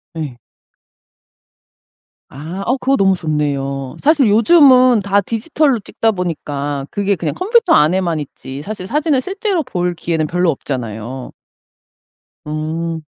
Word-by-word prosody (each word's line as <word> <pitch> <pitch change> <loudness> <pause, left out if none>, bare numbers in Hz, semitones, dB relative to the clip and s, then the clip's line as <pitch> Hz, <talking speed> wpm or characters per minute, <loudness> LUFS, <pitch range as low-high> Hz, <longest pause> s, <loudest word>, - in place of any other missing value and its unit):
예. 150 -7 -5 1.9
아 160 +8 -7
어 255 - +1
그거 270 +1 +1
너무 195 -1 +3
좋네요. 140 -4 -2
사실 290 -3 +4
요즘은 255 +1 +6
다 200 +1 +1
디지털로 245 - 0
찍다 225 +2 -1
보니까 145 -6 -4
그게 200 0 0
그냥 165 - -3
컴퓨터 435 0 +3
안에만 170 +1 +2
있지 135 -1 -8
사실 200 0 -6
사진을 295 +2 +1
실제로 385 0 -2
볼 180 -9 -2
기회는 160 -2 -1
별로 180 +1 +1
없잖아요. 125 -3 -5 1.1
음. 160 +2 -3
180 Hz, 255 characters per minute, -17 LUFS, -, 1.9 s, 요즘은